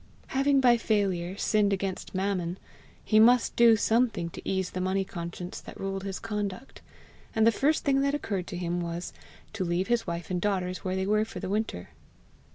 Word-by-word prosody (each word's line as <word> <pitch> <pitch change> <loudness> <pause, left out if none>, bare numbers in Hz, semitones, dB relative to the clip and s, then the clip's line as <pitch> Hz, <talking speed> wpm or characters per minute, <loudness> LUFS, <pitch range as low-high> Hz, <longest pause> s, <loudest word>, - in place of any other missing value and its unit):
Having 275 +1 +3
by 245 -2 +5
failure 195 -5 0
sinned 210 -1 +2
against 195 -1 -3
Mammon, 185 -2 -1 0.5
he 215 - +4
must 240 +2 +5
do 235 -1 +7
something 220 -6 +1
to - - -8
ease 190 -1 -1
the 185 - -3
money 190 +1 0
conscience 175 0 -6
that - - -11
ruled 195 0 -3
his 195 -1 -3
conduct; 210 +2 -5 0.5
and 220 0 +4
the 230 - +6
first 295 +7 +1
thing 275 -1 +3
that 280 +1 +1
occurred 200 -10 -3
to 180 - -5
him 175 0 -2
was, 170 +1 -5 0.4
to 215 -4 -2
leave 175 +3 -1
his 235 -3 +1
wife 170 +1 -4
and 180 -1 -1
daughters 185 -2 -1
where 185 0 -3
they 190 0 -1
were 215 +2 +2
for 215 -4 -7
the - - -5
winter. 205 - -2
195 Hz, 190 wpm, -28 LUFS, 180-225 Hz, 0.5 s, do